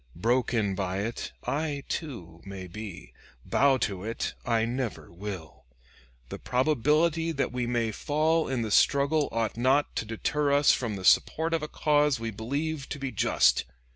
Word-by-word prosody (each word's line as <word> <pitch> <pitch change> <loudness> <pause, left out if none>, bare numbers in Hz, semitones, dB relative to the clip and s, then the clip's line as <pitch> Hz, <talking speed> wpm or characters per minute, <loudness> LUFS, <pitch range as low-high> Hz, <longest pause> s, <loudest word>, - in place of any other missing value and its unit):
Broken 115 0 +1
by 95 0 -2
it 115 +2 -4
I, 145 -1 -2
too, 90 - -6
may 95 -1 -7
be; 90 - -9 0.3
bow 140 -1 +3
to 95 -2 -5
it, 115 +2 -3
I 115 -2 +1
never 120 -2 -4
will. 90 -5 -8 0.6
The - - -6
probability 155 +5 +1
that 140 -5 -1
we 125 -1 -2
may 120 -2 0
fall 155 +7 +1
in 130 -3 -1
the 110 - -4
struggle 140 +5 +3
ought 115 -1 -1
not 130 +4 +2
to - - -1
deter 140 +7 -1
us 145 +1 +5
from 115 -5 -1
the 95 -1 -6
support 160 - +3
of 165 - +1
a 150 - -3
cause 150 -3 +2
we 115 0 -3
believe 140 +7 -3
to - - -4
be 135 -2 -4
just. - - +3
125 Hz, 165 wpm, -28 LUFS, 105-145 Hz, 0.6 s, us